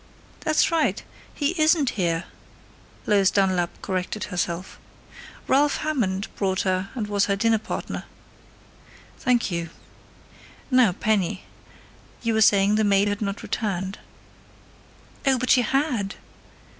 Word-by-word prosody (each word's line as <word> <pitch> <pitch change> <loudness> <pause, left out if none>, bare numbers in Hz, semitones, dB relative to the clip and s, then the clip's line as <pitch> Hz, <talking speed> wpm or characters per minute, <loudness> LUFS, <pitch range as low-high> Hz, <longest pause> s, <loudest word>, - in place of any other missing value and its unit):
"That's 310 +1 +2
right! 330 -2 +1 0.3
He 290 -1 -1
isn't 310 -4 +4
here!" 170 -4 -1 0.8
Lois 200 -2 +4
Dunlap 185 -3 +1
corrected 185 +3 -3
herself. 180 -1 -3 0.7
"Ralph 285 +2 +3
Hammond 215 -11 -1
brought 190 -1 0
her 185 0 -1
and 230 -4 -2
was 205 -1 +1
her 200 - +1
dinner 225 +2 +2
partner." 215 - -5 1.1
"Thank 245 -5 +1
you.... 170 -1 -3 1.0
Now, 250 -7 +5
Penny. 200 -1 0 0.8
You 230 -1 +1
were 220 - +2
saying 205 0 +4
the 220 - +2
maid 200 0 +3
had 205 +1 -3
not 200 0 -3
returned." 195 -3 -3 1.3
"Oh, 265 -1 +4
but 255 +1 0
she 255 - +6
had!" 245 -5 0
205 Hz, 120 wpm, -24 LUFS, 190-245 Hz, 1.3 s, she